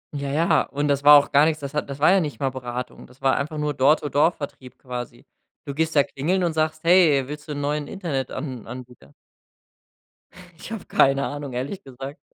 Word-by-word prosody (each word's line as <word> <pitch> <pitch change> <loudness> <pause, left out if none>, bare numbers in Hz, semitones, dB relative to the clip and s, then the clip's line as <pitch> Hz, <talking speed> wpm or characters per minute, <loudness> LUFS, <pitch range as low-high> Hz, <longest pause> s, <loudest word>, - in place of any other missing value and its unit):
Ja, 140 -1 -4
ja. 155 +1 +2
Und 145 +1 -3
das 140 0 +1
war 145 0 +10
auch 145 - +1
gar 145 +2 +5
nix, 155 -1 0
das 140 -1 -7
hat 150 -1 -2
das 140 0 -6
war 155 +5 +5
ja 195 - +5
nicht 150 -5 -4
mal 135 - +1
Beratung. 125 -1 -7
Das 125 +1 -21
war 135 -1 +2
einfach 155 +2 -3
nur 150 0 -1
dort 140 +4 +3
so 145 - -4
Door-to-Door 150 +4 +3
Vertrieb 130 -4 -9
quasi. 125 -2 -8 0.4
Du 140 - -6
gehst 160 +2 -1
da 145 - +6
klingeln 175 +9 -1
und 170 - +1
sagst: 155 0 -1
„Hey, 165 -6 +5
willst 150 0 -8
du 150 - -4
'n 145 - -4
neuen 145 0 -2
Internetan 135 - -5
Anbieter”? 120 - -11 1.4
Ich - - -10
hab 225 -3 -7
keine 135 0 +3
Ahnung, 145 -2 -6
ehrlich 140 +11 -4
gesagt. 135 +3 -9
145 Hz, 215 wpm, -23 LUFS, 135-155 Hz, 1.4 s, war